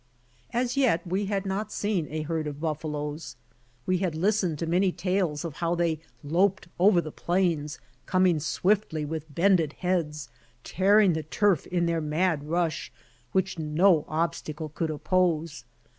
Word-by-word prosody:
As 245 +2 0
yet 230 -12 +2
we 190 +3 -1
had 200 -1 -1
not 195 +3 -2
seen 205 -7 -1
a 155 0 -3
herd 160 0 -2
of 145 -1 -6
buffaloes. 150 -1 -4 0.5
We 185 -1 +1
had 180 -4 -1
listened 185 -2 +1
to 165 - -2
many 180 +3 +2
tales 180 -4 -1
of 155 -4 -6
how 170 0 0
they 170 -2 0 0.2
loped 180 +5 +1
over 185 -1 +5
the 155 - -7
plains, 170 -4 0 0.3
coming 185 -3 +3
swiftly 160 +1 0
with 155 -1 -6
bended 170 -4 +3
heads, 165 -5 -2 0.3
tearing 200 0 +4
the 160 - -1
turf 175 +2 +1
in 175 -1 0
their 170 -1 0
mad 155 0 0
rush, 165 -1 -1 0.4
which 190 -2 0
no 160 +2 +3
obstacle 155 -1 -2
could 160 +2 -3
oppose. 160 -3 0
170 Hz, 150 wpm, -27 LUFS, 155-185 Hz, 0.5 s, over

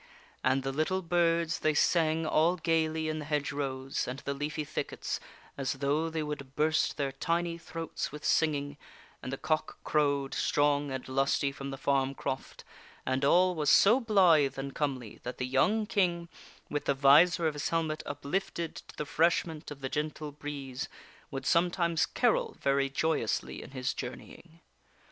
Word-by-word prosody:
And 130 +1 +2
the 135 - -1
little 170 +7 0
birds 170 -1 +1
they 155 -1 +1
sang 160 0 +2
all 160 +3 +3
gayly 160 -1 0
in 155 0 -2
the 150 - -6
hedge 145 -1 -1
rows 135 -1 -3
and 125 +2 -4
the 140 0 -4
leafy 150 +2 -3
thickets 150 +1 -4 0.4
as 130 -2 0
though 145 +4 0
they 160 -1 -2
would 140 -2 -6
burst 155 +1 +1
their 140 -2 -1
tiny 170 +5 -1
throats 165 -1 -5
with 150 0 -8
singing, 145 -2 +1 0.4
and 130 - -5
the 135 - -3
cock 155 +2 -1
crowed, 140 -2 +1
strong 145 0 +2
and 130 -1 -5
lusty, 135 +1 +1
from 140 0 -7
the 135 - -5
farm 135 0 +1
croft, 130 0 -5 0.4
and 130 +1 0
all 180 +6 +5
was 150 -4 0
so 220 - +6
blithe 175 - +4
and 135 0 -4
comely 130 -7 -3
that 125 - -6
the 125 - -2
young 205 +13 +2
King, 175 -4 0 0.4
with 145 - -3
the 140 - +2
visor 155 +6 +6
of 155 - +1
his 145 -1 -2
helmet 160 -2 -1
uplifted 165 +4 -3
to - - -12
the - - -2
refresh 165 +4 +2
ment 160 -2 -8
of 145 -2 -9
the 135 - -2
gentle 150 +1 -3
breeze, 145 -1 -6 0.4
would 135 -2 -5
sometimes 170 0 +2
carol - - +1
very 140 0 +2
joyously 140 -4 -1
in - - -10
his 130 -1 -2
journeying. 160 +6 -9
150 Hz, 170 wpm, -30 LUFS, 135-165 Hz, 0.4 s, so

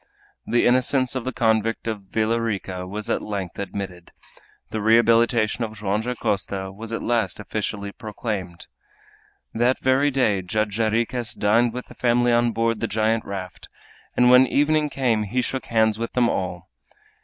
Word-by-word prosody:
The 120 - +2
innocence 130 +1 +3
of 130 -2 -4
the 130 - -1
convict 115 -2 0
of 110 -2 -3
Villa 115 +2 0
Rica 95 -5 -3
was 105 +2 -5
at - - 0
length 100 -4 -5
admitted. 95 -3 -6 0.6
The 110 - -2
rehabilitation 115 +1 +3
of 110 -1 -5
Joam 105 0 -1
Dacosta 100 -5 -2
was 110 +3 -8
at 115 - -3
last 120 -2 0
officially 105 -1 -4
proclaimed. 100 -5 -5 0.9
That 120 +3 +2
very 130 +2 +3
day 120 -8 +1
Judge 105 +3 -2
Jarriquez 115 +2 0
dined 115 +3 +2
with 125 0 -5
the - - -14
family 120 0 +2
on 120 0 +3
board 115 -1 0
the 115 - -1
giant 110 +1 0
raft, 95 -2 -7 0.5
and 125 0 +5
when 125 +1 +7
evening 150 +2 +2
came 125 -6 +1
he 125 +5 -1
shook 130 +2 -4
hands 110 -1 +2
with 115 - -4
them 125 -1 +3
all. 90 -3 -3
115 Hz, 160 wpm, -23 LUFS, 105-120 Hz, 0.9 s, when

